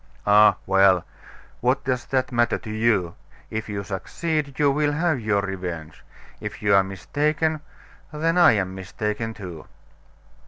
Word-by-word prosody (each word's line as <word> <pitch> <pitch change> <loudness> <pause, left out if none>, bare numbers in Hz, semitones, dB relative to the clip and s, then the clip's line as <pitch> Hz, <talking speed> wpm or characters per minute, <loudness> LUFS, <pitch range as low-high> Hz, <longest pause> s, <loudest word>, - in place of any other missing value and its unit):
"Ah, 105 +1 +6
well! 95 -2 +4 0.5
what 125 +3 +1
does 125 -2 -1
that 130 -1 -1
matter 120 -1 +2
to 110 - -8
you? 110 -6 +1 0.4
If 110 0 -4
you 100 -1 -3
succeed, 140 - -3
you 145 -2 +3
will 145 +1 +1
have 160 -2 +1
your 105 -3 0
revenge. 90 -6 -6 0.4
If - - -7
you 100 -1 +3
are 95 0 +6
mistaken 150 - -1 0.5
then 160 +2 0
I 175 -6 +6
am 95 -3 -1
mistaken, 105 +4 -4
too." 90 -6 -9
110 Hz, 145 wpm, -23 LUFS, 95-140 Hz, 0.5 s, Ah